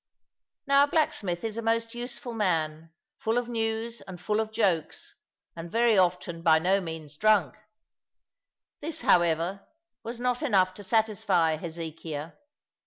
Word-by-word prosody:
Now 280 0 +5
a - - -10
blacksmith 200 - 0
is 225 -1 -3
a - - -2
most 230 +1 0
useful 240 0 -6
man, 165 -6 -1 0.3
full 230 -3 0
of 245 -1 0
news 225 0 -2
and 185 -2 -8
full 210 +4 0
of 220 0 -2
jokes, 195 -8 -1 0.4
and 170 0 -7
very 230 -1 +3
often 180 -2 +1
by 160 -2 +5
no 190 +5 +2
means 160 -4 -7
drunk; 210 -9 +3 1.3
this, 320 +1 -5
however, 175 +3 +2 0.4
was 230 +1 -6
not 250 +1 0
enough 190 -10 +3
to 205 - -10
satisfy 200 -6 +2
Hezekiah. 160 -1 -6
200 Hz, 140 wpm, -28 LUFS, 165-230 Hz, 1.3 s, Now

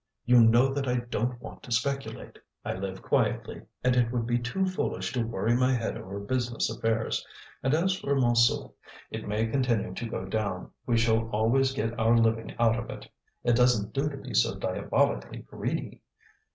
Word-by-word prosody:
You 125 0 +6
know 120 +4 +5
that 135 -1 -2
I 125 - +1 0.2
don't 120 +2 -1
want - - -10
to 125 - -12
speculate. 135 +4 -2 0.3
I - - -1
live 95 0 -5
quietly, - - 0 0.2
and 125 0 +3
it 120 -2 +2
would 120 -2 -1
be 120 +1 +1
too 125 +11 -1
foolish 185 -9 -2
to 125 - 0
worry 115 0 0
my 130 +1 +3
head 115 -2 -2
over 100 +2 -6
business 120 +2 -1
affairs. 115 0 -1 0.4
And 135 +3 +2
as 185 +3 +1
for 140 - 0
Montsou, 120 -3 +3 0.4
it - - -5
may 105 +2 0
continue 115 -3 0
to 115 - -5
go 95 - -4
down, 100 -2 -3 0.2
we 120 -2 +3
shall 115 0 +2
always 115 +5 +2
get 115 -2 -2
our 115 +1 +4
living 115 -1 +1
out 115 0 +3
of 120 - -7
it. - - -8 0.4
It 120 - +3
doesn't 120 -4 +3
do 140 +2 0
to 140 - -7
be - - -8
so - - +3
diabolically - - 0
greedy! - - -4
120 Hz, 185 wpm, -28 LUFS, 110-125 Hz, 0.4 s, You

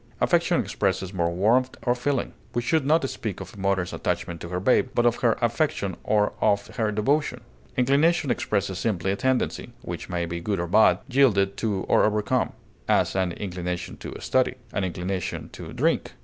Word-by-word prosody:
Affection - - +3
expresses 95 -1 -1
more 85 -2 +1
warmth 115 +9 +2
of 120 0 +2
feeling; 135 +1 -1 0.2
we 120 - +2
should 140 +2 +1
not 155 -2 +3
speak 110 -7 -5
of 95 -1 -8
a - - -14
mother's 95 -2 0
attachment 85 -1 -3
to 85 - -6
her 90 0 -2
babe, 125 +5 +3
but 120 - +3
of 120 0 +3
her 115 -2 +2
affection 120 -5 0
or 105 -1 +2
of 100 0 +2
her 110 -3 +1
devotion. 135 +9 0 0.4
Inclination 140 +3 +3
expresses 100 -5 -1
simply 95 -4 0
a - - 0
tendency, 130 +4 -1
which - - -6
may 85 -1 -1
be 85 0 -4
good 100 +3 -2
or 85 - -1
bad, 105 +6 +5
yielded 115 -8 +3
to 100 -4 -1
or - - +4
overcome; 105 -1 +1 0.3
as, - - +2
an 95 -2 +1
inclination 90 -2 -4
to - - -8
study; - - +1 0.2
an 100 - -1
inclination 90 0 -3
to - - -9
drink. - - 0
105 Hz, 180 wpm, -25 LUFS, 95-125 Hz, 0.4 s, bad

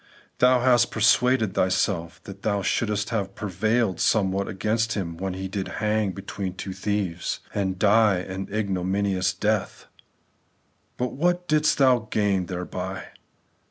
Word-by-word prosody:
Thou 125 0 +5
hast 120 -1 +4
persuaded 110 0 +3
thyself 90 -2 0
that 100 0 -10
thou 100 -2 0
shouldest 105 -1 -1
have 100 -4 -2
prevailed 110 0 0
somewhat 100 -2 +1
against 110 +3 -1
Him 85 -5 -3
when 95 +1 -4
He 95 0 -4
did 95 0 -4
hang 105 -2 0
between 95 -1 -5
two 95 0 -6
thieves, 95 -3 -2
and 95 -2 -1
died 105 -2 +3
an 95 +1 -5
ignominious 95 -2 0
death; 105 +3 -2 1.1
but 125 0 -2
what 175 +4 0
didst 155 0 +2
thou 125 -5 +3
gain 100 -4 +1
thereby 90 +1 -5
100 Hz, 130 wpm, -25 LUFS, 95-110 Hz, 1.1 s, Thou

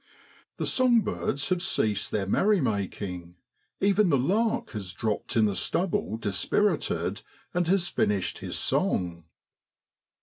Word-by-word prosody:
The - - -2
song 250 -3 +3
birds 145 -6 -2
have 180 -2 +1
ceased 105 - +1
their 100 -2 -1
merrymaking, 100 - 0 0.4
even 200 0 +3
the 140 - +4
lark 210 - 0
has 100 -5 -5
dropped 110 +4 -2
in 110 - +5
the 100 -2 0
stubble 135 - -1
dispirited 100 -5 0 0.3
and 180 -1 +1
has 180 -1 +2
finished 100 - 0
his - - -3
song. 85 -2 0
115 Hz, 125 wpm, -27 LUFS, -, 0.4 s, in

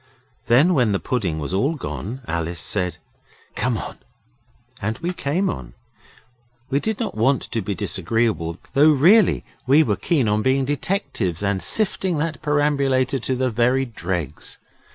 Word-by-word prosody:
Then 140 +10 +5
when 125 -9 +2
the 95 - 0
pudding 95 -11 -2
was 75 +3 -4
all 135 +12 +1
gone, 130 - -6
Alice 85 0 -2
said 90 -1 0 0.6
'Come - - -1
on.' - - -7 0.8
And 110 +2 -2
we 175 +2 -3
came 175 +5 -1
on. - - -5 1.0
We 140 - +2
did 220 +5 -2
not 230 - -2
want 130 +5 +2
to 115 - -3
be 100 +1 -3
disagreeable, 105 -7 -1 0.2
though 145 +3 +6
really 175 +9 +5 0.2
we 145 +4 +6
were 105 -8 0
keen 140 -3 0
on 105 +1 +1
being 130 +3 +2
detectives 135 - -2
and 100 -2 0
sifting 190 -5 0
that 155 -2 -2
perambulator 140 -3 +1
to 130 +2 -1
the 130 0 0
very 125 +4 +2
dregs. 90 - -5
130 Hz, 155 wpm, -22 LUFS, 100-145 Hz, 1.0 s, though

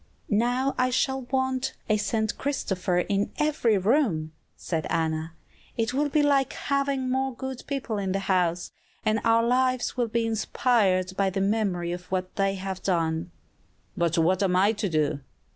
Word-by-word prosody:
"Now 255 +3 +1
I 255 0 +3
shall 265 +1 0
want 260 0 0
a 215 - +3
'St. 220 +1 -1
Christopher' 190 -10 0
in 200 0 0
every 290 -8 +2
room," 190 - +1 0.3
said 160 -3 -3
Anna; 160 0 -1 0.4
"it 225 +1 0
will 290 +2 +1
be 295 +1 +2
like 280 -2 +2
having 275 -2 -1
more 265 0 0
good 265 0 -6
people 260 -6 -2
in 195 -1 -2
the 195 +1 -1
house, 180 -2 0 0.3
and 215 0 +2
our 230 0 +4
lives 255 +1 +1
will 240 -1 +1
be 230 +1 0
inspired 205 -4 +1
by 195 0 +2
the 190 +1 -3
memory 195 -4 0
of 180 +1 -7
what 185 -1 -2
they 195 -1 +1
have 190 -1 -5
done." 165 -2 0 0.7
"But 170 -2 0
what 180 +4 +3
am 185 -2 +2
I 195 +3 +4
to 205 -2 -2
do?" 155 -3 0
210 Hz, 165 wpm, -26 LUFS, 185-255 Hz, 0.7 s, our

